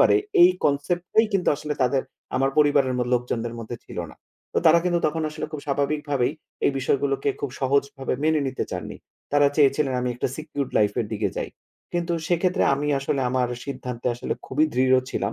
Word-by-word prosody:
পারে -, -, +6 dB, 0.3 s
এই 355 Hz, -, +9 dB
কনসেপ্ট 150 Hz, +5 st, +1 dB
টাই 220 Hz, +1 st, +6 dB
কিন্তু 195 Hz, -2 st, +1 dB
আসলে 150 Hz, 0 st, -4 dB
তাদের 130 Hz, +1 st, +1 dB, 0.3 s
আমার 135 Hz, +1 st, +2 dB
পরিবারের 145 Hz, -3 st, +4 dB
ম -, -, +1 dB
লোকজনদের 120 Hz, -1 st, -2 dB
মধ্যে 115 Hz, +1 st, -6 dB
ছিল -, -, -8 dB
না। -, -, -14 dB, 0.4 s
তো -, -, +4 dB
তারা 165 Hz, +1 st, +7 dB
কিন্তু 175 Hz, -1 st, +2 dB
তখন 160 Hz, +1 st, -1 dB
আসলে 155 Hz, -, -5 dB
খুব 155 Hz, -, -4 dB
স্বাভাবিক 145 Hz, +1 st, 0 dB
ভাবেই 130 Hz, -1 st, +1 dB, 0.3 s
এই -, -, +3 dB
বিষয়গুলোকে 135 Hz, +1 st, 0 dB
খুব 140 Hz, -, -2 dB
সহজভাবে 140 Hz, 0 st, 0 dB
মেনে 155 Hz, 0 st, +3 dB
নিতে 130 Hz, -, -3 dB
চাননি। -, -, -5 dB, 0.4 s
তারা 145 Hz, 0 st, +5 dB
চেয়েছিলেন 140 Hz, -1 st, +3 dB
আমি 125 Hz, -, -1 dB
একটা 120 Hz, -, -1 dB
সিকিউরড 150 Hz, -3 st, -4 dB
লাইফ 105 Hz, -1 st, +3 dB
এর -, -, -2 dB
দিকে -, -, 0 dB
যাই। -, -, -3 dB, 0.4 s
কিন্তু 175 Hz, 0 st, -1 dB, 0.2 s
সেক্ষেত্রে 180 Hz, +2 st, +2 dB
আমি 145 Hz, +2 st, -2 dB
আসলে 135 Hz, 0 st, -1 dB
আমার 125 Hz, -1 st, +1 dB, 0.2 s
সিদ্ধান্তে 125 Hz, -3 st, -5 dB
আসলে 120 Hz, -, -3 dB
খুবই 150 Hz, +4 st, +2 dB
দৃঢ় 130 Hz, +1 st, +4 dB, 0.2 s
ছিলাম। 100 Hz, +2 st, -2 dB
140 Hz, 190 wpm, -24 LUFS, 130-155 Hz, 0.4 s, এই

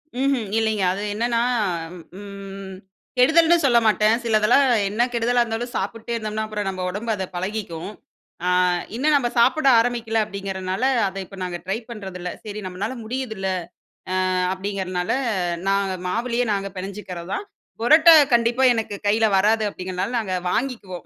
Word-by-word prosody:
ம்ஹும் 260 Hz, -5 st, 0 dB
இல்லைங்க. 220 Hz, -3 st, +1 dB
அது 195 Hz, -, -5 dB
என்னன்னா, 235 Hz, +2 st, 0 dB, 0.8 s
ம். 195 Hz, -1 st, -9 dB, 0.4 s
கெடுதல்னு 325 Hz, +6 st, +5 dB
சொல்ல 245 Hz, -3 st, +5 dB
மாட்டேன். 215 Hz, 0 st, +4 dB
சிலதெல்லாம் 225 Hz, +3 st, +4 dB, 0.3 s
என்ன 215 Hz, +4 st, +1 dB
கெடுதலா 240 Hz, +1 st, +2 dB
இருந்தாலும் 235 Hz, +1 st, -4 dB
சாப்பிட்டே 225 Hz, +4 st, -4 dB
இருந்தோம்னா, 215 Hz, -1 st, -3 dB
அப்புறம் 210 Hz, -2 st, -3 dB
நம்ம 185 Hz, -1 st, -5 dB
உடம்பு 210 Hz, +5 st, -3 dB
அத 190 Hz, -2 st, -3 dB
பழகிக்கும். 185 Hz, -2 st, -4 dB, 0.6 s
அ -, -, +3 dB, 0.5 s
இன்னும் 295 Hz, +5 st, +2 dB
நம்ப 260 Hz, -4 st, +2 dB
சாப்பிட 260 Hz, +5 st, +4 dB
ஆரம்பிக்கல 230 Hz, -1 st, 0 dB
அப்டிங்கிறனால, 195 Hz, 0 st, -4 dB, 0.2 s
அத 190 Hz, -, -7 dB
இப்போ 195 Hz, +2 st, -13 dB
நாங்க 175 Hz, -1 st, -4 dB
ட்ரை 195 Hz, +3 st, -1 dB
பண்ணுறதில்ல. 190 Hz, -5 st, -6 dB
சரி 210 Hz, 0 st, -6 dB
நம்மளால 195 Hz, +7 st, -4 dB
முடியுதுல்ல, 220 Hz, -5 st, -3 dB, 0.8 s
அ -, -, 0 dB, 0.2 s
அப்டிங்கிறதுனால, 190 Hz, -2 st, -3 dB, 0.6 s
நா 195 Hz, -, +3 dB, 0.3 s
மாவுலயே 235 Hz, +5 st, -1 dB
நாங்க 195 Hz, 0 st, -2 dB
பெனஞ்சிக்கிறது 185 Hz, -2 st, -7 dB
தான், 405 Hz, -, -3 dB, 0.4 s
புரோட்டா 315 Hz, +7 st, +7 dB, 0.2 s
கண்டிப்பா 240 Hz, +2 st, +3 dB
எனக்கு 225 Hz, -3 st, -3 dB
கையில 220 Hz, +2 st, +3 dB
வராது, 215 Hz, +3 st, +3 dB
அப்டிங்கிறதுனால 185 Hz, +5 st, -4 dB
நாங்க 190 Hz, -5 st, -2 dB, 0.2 s
வாங்கிக்குவோம் 225 Hz, -8 st, -3 dB
215 Hz, 135 wpm, -22 LUFS, 195-235 Hz, 0.8 s, புரோட்டா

